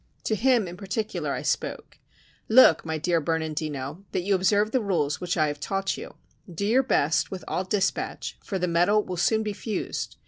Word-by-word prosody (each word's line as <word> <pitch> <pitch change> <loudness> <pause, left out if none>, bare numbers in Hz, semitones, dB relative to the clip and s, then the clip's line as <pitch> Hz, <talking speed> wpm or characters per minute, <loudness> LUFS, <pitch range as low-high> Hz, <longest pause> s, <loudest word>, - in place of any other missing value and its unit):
To - - 0
him 235 -1 +3
in 175 +1 -8
particular 210 +3 -3
I - - -4
spoke: - - -3 0.5
"Look, 220 -8 +7
my 160 -1 -3
dear 170 +1 +1
Bernandino, 155 0 -3
that 180 - 0
you 200 +2 +1
observe 205 +3 +2
the 255 - +1
rules 160 -8 0
which 180 -1 -2
I 155 - +4
have 145 -1 -3
taught 195 +4 -1
you; 485 - -9 0.4
do 175 +4 -3
your 235 +6 +4
best 160 - +1
with 190 -2 -7
all 185 - -2
dispatch, 195 +1 -1
for 195 - -3
the 180 -1 -1
metal 180 +5 +3
will 185 - -5
soon 220 +5 +2
be 210 -1 -3
fused. 215 +2 -4
185 Hz, 195 wpm, -26 LUFS, 160-210 Hz, 0.5 s, Look